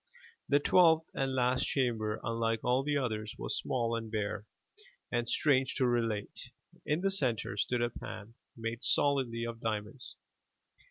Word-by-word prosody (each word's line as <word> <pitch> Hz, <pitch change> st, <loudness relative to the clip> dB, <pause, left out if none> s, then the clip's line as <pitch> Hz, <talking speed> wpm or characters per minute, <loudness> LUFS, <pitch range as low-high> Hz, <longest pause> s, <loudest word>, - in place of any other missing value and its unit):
The 140 Hz, -, +5 dB
twelfth 160 Hz, +1 st, +5 dB
and 135 Hz, -1 st, -1 dB
last 125 Hz, 0 st, +2 dB
chamber 110 Hz, -5 st, 0 dB
unlike 115 Hz, -1 st, -1 dB
all 125 Hz, +2 st, +3 dB
the 145 Hz, +1 st, 0 dB
others 110 Hz, -5 st, -2 dB
was -, -, -3 dB
small 115 Hz, -2 st, -1 dB
and 115 Hz, -1 st, -5 dB
bare, 105 Hz, -1 st, -2 dB, 0.6 s
and, 120 Hz, -1 st, 0 dB
strange 135 Hz, -3 st, +2 dB
to 130 Hz, -, +2 dB
relate, 115 Hz, -4 st, -1 dB, 0.4 s
in 150 Hz, +3 st, +1 dB
the 195 Hz, +1 st, +2 dB
center 125 Hz, -, 0 dB
stood 120 Hz, +3 st, 0 dB
a 120 Hz, -, 0 dB
pan, 110 Hz, -1 st, -8 dB, 0.2 s
made 115 Hz, +2 st, -4 dB
solidly 130 Hz, -5 st, +1 dB
of 115 Hz, 0 st, -5 dB
diamonds. 110 Hz, +3 st, -4 dB
120 Hz, 150 wpm, -32 LUFS, 115-135 Hz, 0.6 s, The